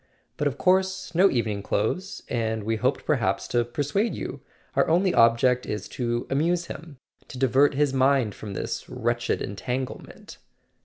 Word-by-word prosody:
But 150 - 0
of 140 -1 -3
course 190 0 +1
no 185 +4 +5
evening 110 - -1
clothes; 180 - -2
and 110 -3 -1
we 110 +1 -1
hoped 130 +5 0
perhaps 110 -10 0
to 120 -1 +2
persuade 145 - -1
you. - - -6 0.3
Our - - +3
only 180 +3 +3
object 120 +2 +4
is 105 - -4
to 120 -1 -2
amuse 170 +5 +1
him—to 140 -5 -12
divert 135 +2 +3
his 145 -1 +2
mind 130 -4 +3
from 105 -2 -8
this - - -4
wretched 120 0 -1
entanglement." 125 +6 -5
130 Hz, 150 wpm, -25 LUFS, 115-155 Hz, 0.3 s, no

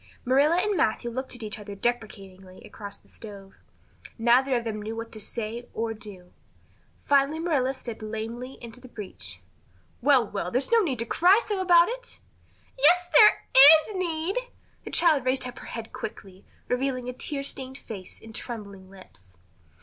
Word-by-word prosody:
Marilla 280 +6 +4
and 410 +3 +1
Matthew 235 -4 0
looked 260 +2 -5
at 240 - -8
each 215 0 -6
other 205 -1 -8
deprecatingly 195 -5 -4
across 205 -2 -9
the - - -28
stove. 200 -3 -11 0.6
Neither 250 +3 +3
of 240 - 0
them 215 -2 -4
knew 220 +2 -5
what 230 0 -6
to 215 - -8
say 230 +2 -5
or 225 0 -2
do. 205 -4 -12 0.7
Finally 280 +2 +3
Marilla 300 -6 0
stepped 235 -3 -7
lamely 225 +4 -6
into 235 +1 -10
the 255 - -13
breach. 210 -5 -9 0.6
"Well, 265 -2 +4
well, 195 -4 -4
there's 255 - -1
no 465 - +6
need 310 - 0
to 230 - -3
cry 360 - +5
so 410 -3 -2
about 345 -2 +6
it." - - -6 0.6
"Yes, 350 +5 +4
there 425 -2 +7 0.5
is 425 - -7
need!" 345 +2 -2 0.5
The - - -6
child 310 -6 +3
raised 255 +1 0
her 250 - -5 0.2
head 230 -1 -7
quickly, 195 -3 -8 0.2
revealing 255 0 -1
a 250 - -4
tear 275 +2 -3
stained 265 -1 -4
face 200 -8 -9
and 225 0 -13
trembling 200 -6 -7
lips. 95 - -16
240 Hz, 165 wpm, -26 LUFS, 215-280 Hz, 0.7 s, there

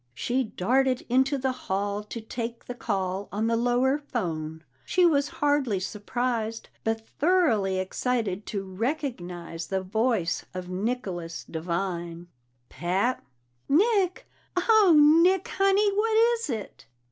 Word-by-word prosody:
She 250 - 0
darted 255 +6 +1
into 265 +3 +3
the 265 0 0
hall 200 -4 -2
to 230 - -6
take 230 +1 -5
the 245 - -5
call 195 -5 -2
on 210 +3 -1
the 230 0 +2
lower 245 +4 +2
phone; 160 - -4 0.2
she 365 -1 +3
was 290 -4 +3 0.2
hardly 275 -9 +2
surprised 225 +3 -3
but 225 0 -2
thoroughly 260 - +3
excited 205 +1 -2
to 200 -3 -3
recognize 185 - -4
the 190 -1 -2
voice 215 -3 0
of 180 -1 -5
Nicholas 185 -4 -3
Devine. 170 0 -4 0.4
"Pat?" 190 - -1 0.5
"Nick! 375 +3 +2 0.3
Oh, 405 -2 +5 0.3
Nick, 370 +1 +3
Honey! 390 +1 +3
What 435 +2 +2 0.2
is 465 -8 -3
it?" 220 -5 -6
230 Hz, 125 wpm, -27 LUFS, 190-275 Hz, 0.5 s, Oh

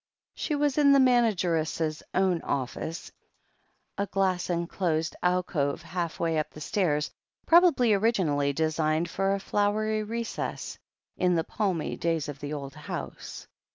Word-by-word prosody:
She 300 - -2
was 290 0 +1
in 280 -1 +6
the 275 - +6
manageress' 175 - +2
own 185 -3 +2
office, 140 +5 -4 0.9
a 200 - 0
glass 190 -2 0
en 170 -1 0
closed 165 -2 -1
alcove 180 -6 0
halfway 165 -2 -1
up 155 - -2
the - - -12
stairs, 150 -2 0 0.3
probably 330 -10 +5
originally 185 -10 +2
designed 155 +2 0
for 195 +1 +1
a - - -3
flowery 215 +2 0
recess, 230 +2 -4 0.4
in 180 -1 +2
the 165 - +1
palmy 190 -4 -2
days 165 -3 -1
of 145 -2 -7
the 145 0 -5
old 140 -2 -5
house. - - -7
175 Hz, 135 wpm, -28 LUFS, 155-210 Hz, 0.9 s, in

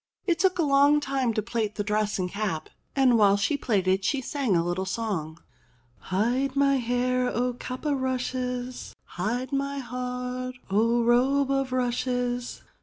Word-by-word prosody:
It 340 -3 +1
took 370 0 +3
a 340 - +2
long 285 +1 +5
time 270 -4 0
to 215 - 0
plait 220 -2 -2
the 205 - -1
dress 210 +1 0
and 185 -2 -1
cap, 200 -7 -3 0.3
and 255 -4 +4
while 200 -1 +5
she 200 +9 +1
plaited 195 -7 +1
she 275 - +1
sang 265 -5 -1
a 165 - +3
little 180 +2 -2
song: 180 -7 -3 0.6
"Hide 245 +8 0
my 275 0 +3
hair, 250 +1 0
O 250 +1 0
cap 255 +3 -7
o' 295 - +2
rushes, 255 -1 -3
Hide 240 +8 -3
my 280 0 -1
heart, 250 0 -4 0.2
O 230 +4 +3
robe 265 +4 +3
o' 270 0 +2
rushes. 245 -1 -2
250 Hz, 160 wpm, -26 LUFS, 215-265 Hz, 0.6 s, long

